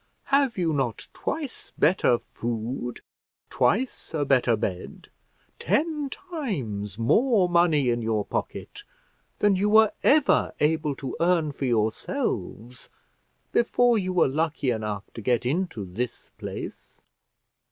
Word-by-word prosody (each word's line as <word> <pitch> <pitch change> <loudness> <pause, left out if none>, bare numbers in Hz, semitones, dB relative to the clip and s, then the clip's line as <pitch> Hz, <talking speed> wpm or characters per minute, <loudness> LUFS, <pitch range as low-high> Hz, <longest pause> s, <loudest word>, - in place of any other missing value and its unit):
Have 275 -5 +3
you 170 -3 +1
not 130 -6 -2
twice 295 -6 -4
better 150 -6 +3
food, 120 +2 -5 0.5
twice 240 -7 0
a 145 -2 0
better 125 -4 +3
bed, 95 -3 -5 0.5
ten 295 - 0
times 140 - -4
more 205 - +3
money 165 -7 +3
in 120 0 -1
your 110 -2 0
pocket 410 - -5 0.5
than 205 -1 +3
you 200 +3 +1
were 220 0 +6
ever 295 0 +3
able 150 -1 +1
to 135 -2 -6
earn 170 -3 +2
for 140 0 -4
yourselves 115 +1 -2 0.6
before 240 0 +3
you 185 -1 -2
were 180 -2 +3
lucky 150 -1 0
enough 105 -2 -4
to 115 - -7
get 120 +1 +1
into 145 - -1
this 115 +7 -5
place? - - -7
150 Hz, 120 wpm, -26 LUFS, -, 0.6 s, were